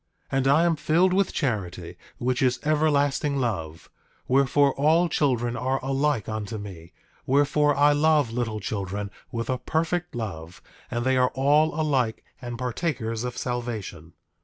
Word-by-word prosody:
8:17 - - +1
And 135 - 0
I 145 +4 +5
am 170 -1 +2
filled 170 +5 +2
with 195 -1 +2
charity, 90 - -3 0.2
which 125 +1 -1
is 130 -1 +2
everlasting 145 -2 +1
love; 85 - -3 0.4
wherefore, 140 +1 +3
all 160 +5 +3
children 120 -7 0
are 130 +2 -1
alike 135 -4 0
unto 110 0 -4
me; 90 -5 -9 0.4
wherefore, 145 +2 +3
I 145 +1 +5
love 145 -4 +3
little 115 -2 -2
children 100 0 -4 0.2
with 115 -1 -3
a 130 -1 -1
perfect 165 +4 -2
love; 90 -8 -6 0.3
and 120 0 -2
they 130 0 +2
are 125 0 +3
all 150 +4 +3
alike 130 -7 0 0.2
and 120 -1 -6
partakers 120 -3 -2
of 125 -1 -5
salvation. 110 -10 -5
130 Hz, 150 wpm, -25 LUFS, 110-145 Hz, 0.4 s, I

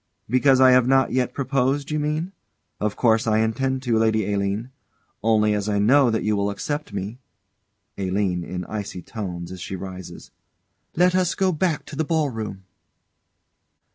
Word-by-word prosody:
_] - - -51 0.2
Because 130 +2 +4
I 130 -1 +7
have 125 -1 +5
not 135 0 +3
yet 125 -1 0
proposed, 135 +1 0
you 150 - 0
mean? 155 +4 -2 0.5
Of 105 -1 -1
course 115 -2 +2
I 110 -1 +3
intend 130 +4 0
to, 115 -3 +1
Lady 110 -2 +1
Aline. 100 +5 -2 0.5
Only 105 -1 +3
as 105 0 -1
I 105 - +1
know 125 +6 +5
that 110 -1 0
you 105 0 +1
will 100 0 0
accept 145 +9 -4
me 100 +5 -5 0.8
ALINE. 95 -2 0
[In 90 +1 -5
icy 100 -4 -6
tones, 90 -6 -6
as 95 -1 -8
she 95 - -5
rises.] 95 -1 -9 0.6
Let 180 +2 +4
us 185 -1 +1
go 190 -1 +2
back 165 -1 -1
to 150 - -9
the 160 - 0
ball 155 -3 0
room. 105 -4 -6
115 Hz, 170 wpm, -23 LUFS, 100-135 Hz, 0.8 s, I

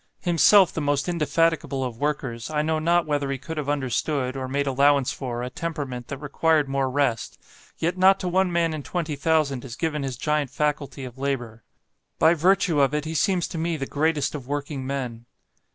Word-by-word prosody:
Himself 180 +2 +5
the 160 - -2
most 145 0 0
indefatigable 165 -4 +1
of 120 -3 -5
workers, 135 -6 -2
I 150 -1 0
know 160 0 0
not 170 +2 +2
whether 145 -2 -1
he 135 - -1
could 150 +5 -7
have 145 -2 -2
understood, 135 -1 -1
or 130 -1 -4
made 140 +2 -1
allowance 140 0 +3
for, 120 -3 -4
a 125 - -5
temperament 140 -8 -5
that 140 - -5
required 150 +1 +1
more 135 -1 0
rest; 130 -4 -1 0.4
yet 175 +3 -1
not 190 +1 +6
to 185 - -2
one 185 +1 +2
man 170 -1 +1
in 155 - -4
twenty 160 0 -3
thousand 140 -3 +1
is 125 -4 -7
given 155 -3 -2
his 135 -3 -4
giant 150 0 0
faculty 140 -1 -2
of 125 +1 -10
labour; 120 -5 -3 0.5
by 160 - +5
virtue 175 -2 +3
of 140 +1 +2
it 150 0 -1
he 160 - -4
seems 180 +1 +1
to 165 - -5
me 165 0 -1
the 135 - -3
greatest 150 0 0
of 140 -4 -7
working 145 -2 -4
men. 125 -4 -4
145 Hz, 200 wpm, -24 LUFS, 135-160 Hz, 0.5 s, not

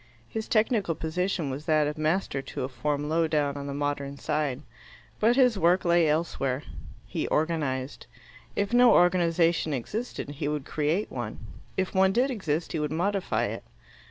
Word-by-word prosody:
His 220 - -4
technical 215 -6 +2
position 165 -1 -2
was 140 +4 -6
that 155 -2 +3
of 150 +1 -2
master 155 -2 0
to 135 - -5
a - - -1
form 145 +2 -2
low 160 +1 +2
down 145 -2 0
on 140 0 -5
the 140 - -4
Modern 140 -1 -2
Side. 150 -2 -2 0.6
But 230 +3 +4
his 250 -6 +4
work 180 +2 +3
lay 170 -2 +4
elsewhere. 150 -4 -1 0.4
He - - -3
organized. 150 -4 -1 0.5
If 200 +3 -1
no 245 0 +7
organization 170 -3 +3
existed, 210 - -4
he 145 +1 -4
would 150 -2 -2
create 160 +8 -1
one. 120 -4 -5 0.4
If 190 -1 -1
one 190 0 +4
did 255 +5 +2
exist, 175 - -2
he 160 - -2
would 150 -1 -1
modify 195 +4 0
it. - - -5
160 Hz, 165 wpm, -27 LUFS, 145-190 Hz, 0.6 s, no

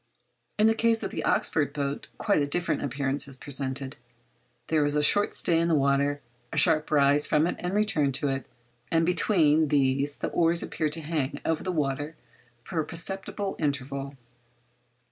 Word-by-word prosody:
In 210 - +3
the 225 - +5
case 225 0 +1
of - - -4
the - - -4
Oxford 150 -9 +1
boat 140 -1 -3
quite 200 -8 +1
a 145 - 0
different 175 +4 -1
appearance 140 +1 -1
is 135 -1 -9
presented—there 130 -1 -3
is 145 0 0
a 150 - +2
short 205 +7 +3
stay 165 -2 +2
in 170 - +1
the 165 - +2
water, 140 0 +1 0.3
a - - -5
sharp 155 0 +3
rise 145 0 +3
from 150 +1 +2
and 180 +1 -3
return 180 -10 +1
to 145 - 0
it, 135 -2 -3 0.4
and 165 0 +2
between 160 -4 +2
these 140 0 +1
the - - -3
oars 170 0 +3
appear 155 - -2
to 160 +2 -1
hang 150 -3 -3
over 160 -1 0
the 185 - -3
water 150 -1 -2 0.5
for 170 +3 -4
a - - +1
perceptible 195 +4 -2
interval. 140 -1 -3
150 Hz, 170 wpm, -26 LUFS, 140-165 Hz, 0.5 s, the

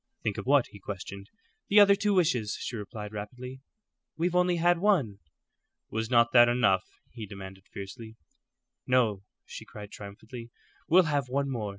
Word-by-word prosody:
"Think 105 -2 -2
of - - -7
what?" 140 -2 +5
he 100 - -12
questioned. 100 +1 -8 0.4
"The 210 - +6
other 200 -1 +8
two 200 0 +1
wishes," 125 - +1
she 125 - -5
replied, 105 0 -7
rapidly. 125 +5 -7 0.6
"We've 170 +2 0
only 180 0 +3
had 175 0 +3
one." 160 - +1 0.7
"Was 110 +1 -2
not 120 -1 +4
that 120 -1 +7
enough?" 120 -6 +2 0.3
he 115 -3 -8
demanded, 95 -1 -10
fiercely. 110 +3 -9 0.7
"No," 115 -6 +2 0.2
she - - -9
cried, 105 0 -11
triumphantly; 110 +4 -10 0.4
"we'll 185 +3 +6
have 145 -5 -1
one 140 +1 -1
more. 110 -5 -3
120 Hz, 160 wpm, -28 LUFS, 105-145 Hz, 0.7 s, other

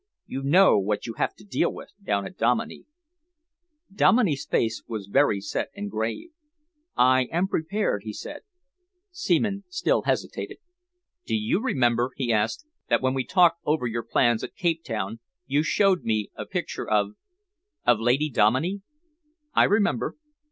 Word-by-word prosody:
You 135 - -5
know 155 - +5
what 105 +1 -2
you 115 - -5
have - - 0
to - - -17
deal 205 - 0
with - - -10
down 100 - 0
at - - -9
Dominey." 120 +1 0 1.1
Dominey's 200 - +3
face 115 0 0
was 110 -4 -5
very 105 0 +2
set 100 0 -3
and 205 0 -5
grave. 115 - -3 0.7
"I 130 +1 +4
am 175 +3 +1
prepared," 165 - -1
he 110 - -5
said. 295 - -8 0.7
Seaman 200 - 0
still 370 +1 +1
hesitated. - - -3 0.7
"Do - - 0
you 215 -2 0
remember," 120 - +1
he 120 -4 0
asked, 110 - 0 0.2
"that - - +2
when 130 0 +2
we 135 -1 -1
talked 170 0 +4
over 150 -4 0
your 115 0 -2
plans 120 -1 +1
at - - -7
Cape 170 -4 0
Town, 110 -1 -4 0.3
you 145 +2 +1
showed 190 +3 +2
me 110 -2 -1
a - - -7
picture - - -4
of 105 -1 +2 0.7
of 120 -3 +4
Lady 130 +6 +1
Dominey?" 130 - +2 0.7
"I - - +5
remember." 205 0 +1
130 Hz, 150 wpm, -25 LUFS, 115-190 Hz, 1.1 s, know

